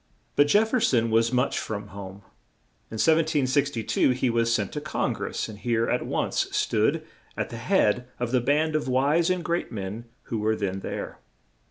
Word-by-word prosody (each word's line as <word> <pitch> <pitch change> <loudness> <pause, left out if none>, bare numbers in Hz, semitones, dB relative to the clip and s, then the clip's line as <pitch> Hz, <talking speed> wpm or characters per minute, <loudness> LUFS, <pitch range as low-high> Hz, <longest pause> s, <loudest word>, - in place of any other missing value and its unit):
But 145 - +5
Jef 210 +8 +4
fer 255 - +3
son 120 - +2
was 115 +1 +3
much 125 0 +1
from 105 -2 -5
home. 100 0 -9 0.7
In 110 - -6
1762 145 -6 +2
he 125 -1 +1
was 115 0 +1
sent 105 -4 0
to 150 - -4
Con 155 - -1
gress, - - -4
and 105 -2 -10
here 115 +1 +1
he - - +1
at - - -1
once - - 0
stood - - +1 0.3
at - - -3
the - - -6
head 125 +4 +2
of 120 -1 -2
the 130 -1 +3
band 150 +5 +1
of 155 - 0
wise 145 +7 +2
and 185 -1 -1
great 170 0 -1
men 105 +2 -5 0.2
who 115 - -3
were 110 +1 +1
then 95 -2 -2
there. - - -6
120 Hz, 190 wpm, -26 LUFS, 110-150 Hz, 0.7 s, But